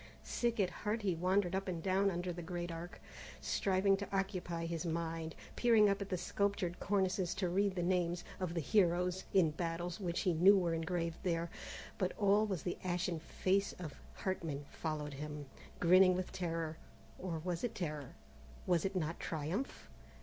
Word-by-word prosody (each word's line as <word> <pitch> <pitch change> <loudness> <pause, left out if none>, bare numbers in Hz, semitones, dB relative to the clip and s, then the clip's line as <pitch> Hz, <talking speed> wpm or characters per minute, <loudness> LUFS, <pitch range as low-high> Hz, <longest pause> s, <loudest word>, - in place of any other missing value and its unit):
Sick 235 -1 0
at 185 -3 +2
heart 210 +5 -2
he 190 -3 +2
wandered 180 +2 +2
up 195 +1 -1
and 170 -3 -3
down 195 +1 +3
under 175 -1 -2
the 175 - -6
great 175 0 -4
Arc, 170 +1 -7 0.4
striving 195 0 +2
to 200 - -5
occupy 185 -4 -1
his 165 0 -2
mind, 165 -1 -2 0.2
peering 225 -4 +6
up 200 +1 -1
at 200 - -4
the 185 - 0
sculptured 200 -2 -1
cornices 190 -2 +1
to 190 -1 0
read 195 +2 +2
the 175 - 0
names 175 -1 +1 0.2
of 180 -2 -2
the 165 - +1
heroes 180 0 +2
and 165 -5 +5
battles 170 +2 -2
which 175 -3 -1
he 180 - +2
knew 190 +5 +7
were 175 -3 +1
engraved 165 0 -1
there, 170 -2 -1 0.5
but 185 -3 +1
always 205 -4 +3
the 175 - -3
ashen 175 -2 0
face 190 +4 +1
of 160 -6 -7 0.2
Hartman 160 -7 -3
followed 150 -2 -3
him, 150 +1 -5 0.3
grinning 185 +1 +7
with 185 0 -3
terror! 165 -3 -2 0.4
or 175 -3 -3
was 175 -2 -2
it 240 - -1
terror? 150 -6 -4 0.5
was 175 -3 +3
it 195 0 -1
not 165 -2 -1
triumph? 165 - -3
180 Hz, 170 wpm, -36 LUFS, 165-190 Hz, 0.5 s, knew